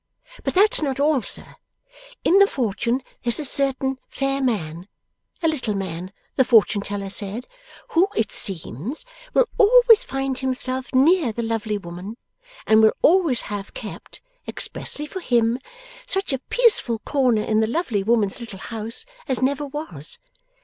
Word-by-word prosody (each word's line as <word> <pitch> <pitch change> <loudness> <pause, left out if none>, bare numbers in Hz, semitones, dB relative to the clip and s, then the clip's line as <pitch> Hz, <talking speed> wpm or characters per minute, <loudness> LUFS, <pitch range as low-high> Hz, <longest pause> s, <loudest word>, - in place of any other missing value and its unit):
But - - -2
that's 425 +4 +5
not 275 -3 -2
all, 290 -2 +3
sir. - - -6 0.7
In 385 - +5
the 400 - +7
fortune 245 - -1 0.2
there's 240 +2 +2
a 300 - -3
certain 270 -1 +1
fair 275 0 -1
man 180 -8 -2 0.6
a - - +4
little 255 -9 -1
man, 185 -1 -5 0.3
the 260 - +6
fortune 225 -4 +4
teller 200 0 -4
said 205 +4 0 0.4
who, 350 +4 +3
it 220 -1 0
seems, 195 - -2 0.3
will - - +4
always 470 +1 +7
find 270 -1 -3
himself 260 0 -2
near 285 +1 +4
the 235 +2 -4
lovely 225 -2 -2
woman, 185 +4 -8 0.5
and 220 0 +5
will 220 - +5
always 325 -8 +4
have 200 -1 -7
kept, - - -9 0.2
expressly 300 - -1
for 375 - -7
him, 240 -5 +1 0.5
such 385 - -1
a 265 - -1
peaceful 450 - +2
corner 245 -3 +1
in 215 0 +1
the 220 - +2
lovely 235 - -1
woman's 215 -1 +1
little 230 -5 -7
house 225 +3 -5 0.2
as 260 -2 0
never 280 +2 0
was. 270 - -6
250 Hz, 150 wpm, -22 LUFS, 215-290 Hz, 0.7 s, the